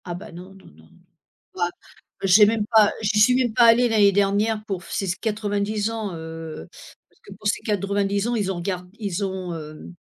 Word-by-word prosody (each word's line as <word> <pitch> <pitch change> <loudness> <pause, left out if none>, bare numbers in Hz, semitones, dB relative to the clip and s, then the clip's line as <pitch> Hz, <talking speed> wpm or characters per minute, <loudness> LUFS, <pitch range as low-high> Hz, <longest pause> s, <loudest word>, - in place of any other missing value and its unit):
Ah, 175 - -5
bah, 175 - -10
non, 180 +3 -11
non, 195 - -18
non, - - -17 0.2
non. - - -23 0.5
Bon 185 - -8
apr 175 0 +1 0.5
bah - - 0
j'ai 205 +3 +7
même 215 0 0
pas 215 -2 +6
j'y 215 0 0
suis 215 +4 +5
même 250 -3 +1
pas 240 - +4
allée 235 +1 +6
l'année 210 -3 +4
dernière 205 +2 +1
pour 195 -4 -4
f - - -13
ces 195 - -2
90 210 -1 -1
ans, 220 -4 -4
heu, 160 - -8 0.4
parce - - -32
que - - -14
pour 205 +2 -6
ces - - 0
90 200 0 -1
ans, 240 - -1
ils 200 -4 -1
ont - - -4
regard 180 +1 -4
ils 200 -2 -3
ont, 185 -2 -4
hem, 155 +2 -10
200 Hz, 220 wpm, -23 LUFS, 185-215 Hz, 0.5 s, j'ai